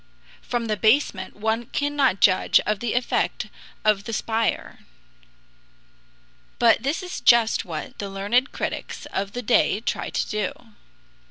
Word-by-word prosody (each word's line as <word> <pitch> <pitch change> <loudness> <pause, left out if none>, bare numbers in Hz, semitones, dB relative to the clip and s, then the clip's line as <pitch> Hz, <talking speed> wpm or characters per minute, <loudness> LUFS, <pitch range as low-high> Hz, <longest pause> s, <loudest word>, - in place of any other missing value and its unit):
From 240 -1 -2
the 215 -1 -1
basement 225 +8 +1
one 220 +2 -1
cannot 285 -7 0
judge 185 -2 +5
of 210 -1 -1
the 240 0 -2
effect 245 0 -1 0.4
of 210 -1 +2
the 230 - -5
spire. 225 0 -1 1.8
But 230 -2 +4
this 290 - -2
is 360 - -6
just 235 -2 +4
what 160 -4 -7
the 200 - -4
learned 205 +7 0
critics - - -5
of 200 +1 -2
the 245 - -4
day 205 -1 +3
try 225 - -3
to - - -2
do. 210 -3 -2
225 Hz, 140 wpm, -24 LUFS, 205-245 Hz, 1.8 s, judge